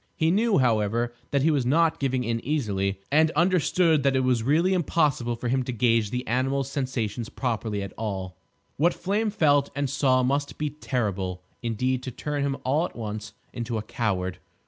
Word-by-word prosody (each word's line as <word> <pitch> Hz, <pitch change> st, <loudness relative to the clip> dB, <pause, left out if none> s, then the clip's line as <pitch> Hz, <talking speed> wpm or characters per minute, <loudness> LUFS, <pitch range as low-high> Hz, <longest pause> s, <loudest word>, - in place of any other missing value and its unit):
He 160 Hz, +1 st, +2 dB
knew, 215 Hz, +2 st, +3 dB
however, 120 Hz, -1 st, +1 dB, 0.2 s
that 140 Hz, -1 st, +1 dB
he 160 Hz, -, +4 dB
was 140 Hz, -4 st, +1 dB
not 160 Hz, +6 st, +2 dB
giving 130 Hz, -2 st, 0 dB
in 115 Hz, -1 st, -2 dB
easily, 100 Hz, -9 st, -1 dB
and 155 Hz, +2 st, +5 dB
understood 170 Hz, -1 st, +3 dB
that 135 Hz, 0 st, +2 dB
it 130 Hz, -, +3 dB
was 125 Hz, -3 st, +2 dB
really 160 Hz, +10 st, +2 dB
impossible 150 Hz, -9 st, +1 dB
for 120 Hz, +1 st, -5 dB
him 130 Hz, +2 st, +1 dB
to 125 Hz, -, -3 dB
gauge 115 Hz, -2 st, +2 dB
the 125 Hz, +3 st, -3 dB
animal's 135 Hz, +3 st, 0 dB
sensations 125 Hz, -5 st, -2 dB
properly 110 Hz, -5 st, -2 dB
at 100 Hz, -, -7 dB
all. 95 Hz, -4 st, -4 dB, 0.4 s
What 170 Hz, +5 st, +3 dB
Flame 205 Hz, +4 st, 0 dB
felt, 145 Hz, -8 st, +3 dB
and 140 Hz, 0 st, 0 dB
saw, 130 Hz, -2 st, +2 dB
must 140 Hz, +3 st, -1 dB
be 150 Hz, -1 st, -2 dB
terrible 100 Hz, -10 st, -3 dB, 0.2 s
indeed 125 Hz, +3 st, -1 dB
to 130 Hz, -, -5 dB
turn 145 Hz, +4 st, -3 dB
him 140 Hz, -1 st, -1 dB
all 145 Hz, +6 st, +2 dB
at -, -, -19 dB
once 110 Hz, -2 st, -5 dB, 0.2 s
into 120 Hz, -1 st, -3 dB
a 105 Hz, -, -3 dB
coward. 95 Hz, -6 st, -2 dB
130 Hz, 185 wpm, -26 LUFS, 115-145 Hz, 0.4 s, and